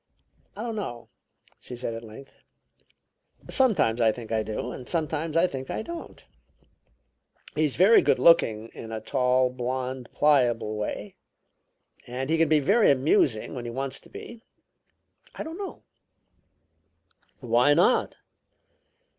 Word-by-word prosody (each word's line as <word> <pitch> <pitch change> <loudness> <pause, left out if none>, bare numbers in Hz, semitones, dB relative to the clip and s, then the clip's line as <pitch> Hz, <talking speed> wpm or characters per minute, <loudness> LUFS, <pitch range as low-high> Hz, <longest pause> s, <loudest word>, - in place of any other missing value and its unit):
"I 215 - -6
don't 230 -2 -4
know," 120 - -6 0.5
she 125 - -8
said 120 -1 -4
at 115 +1 -7
length. 115 +5 -12 1.2
"Sometimes 160 - +3
I 110 -1 +5
think 115 0 -9
I 110 -1 +1
do, 110 +3 -4
and 125 - -9
sometimes 160 -1 -1
I 170 - +5
think 135 -6 -5
I - - -3
don't. 340 +6 -9 1.3
He's 150 -3 0
very 195 +7 +6
good - - +2
looking 115 -10 +4
in 115 - -10
a 110 - -4
tall, 125 +1 +1
blond, 130 0 -4
pliable 120 -7 +2
way, 105 0 -5 0.9
and 130 +4 -4
he 165 - +2
can 165 -2 +3
be 155 -1 +4
very 205 - +3
amusing 130 -4 +2
when 125 -3 -6
he - - -4
wants 135 +3 -3
to - - -19
be. 235 0 -11 0.9
I - - -5
don't 325 +4 -8
know." 395 - -7 1.6
"Why 125 +3 +3
not?" 180 +10 +2
130 Hz, 140 wpm, -26 LUFS, 120-165 Hz, 1.6 s, very